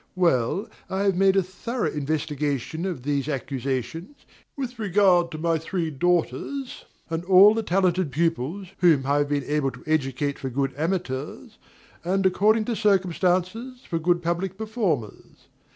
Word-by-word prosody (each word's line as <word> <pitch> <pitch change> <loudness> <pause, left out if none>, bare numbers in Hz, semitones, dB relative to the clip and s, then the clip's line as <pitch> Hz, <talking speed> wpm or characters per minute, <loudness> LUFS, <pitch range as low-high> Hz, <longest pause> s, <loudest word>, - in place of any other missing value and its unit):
Well, 175 - +1 0.2
I 190 +1 -1
have 195 -2 +2
made 195 +1 +4
a 195 - +4
thorough 215 +7 -3
investigation 150 +1 -2
of 170 -10 -5
these 145 0 -1
accusations, 135 - -4 0.4
with 250 -3 -5
regard 190 -4 +3
to 160 - -7
my 165 0 0
three 165 0 -3
daughters, 175 - -1 0.3
and 165 +1 -2
all 195 +3 +8
the 225 - -1
talented 185 -5 +1
pupils 165 +4 -1
whom 160 -7 +4
I 140 +1 +2
have 145 0 0
been 145 -1 0
able 145 -1 0
to - - -13
educate 140 -2 -1
for 135 - -4
good 135 +1 -1
amateurs, 155 -4 -4 0.4
and, 190 +2 0
according 215 +4 +3
to 235 - -1
circumstances, 195 +4 0
for 165 - -1
good 175 +1 +1
public 175 +3 -2
performers. 200 - -3
175 Hz, 150 wpm, -25 LUFS, 145-195 Hz, 0.4 s, all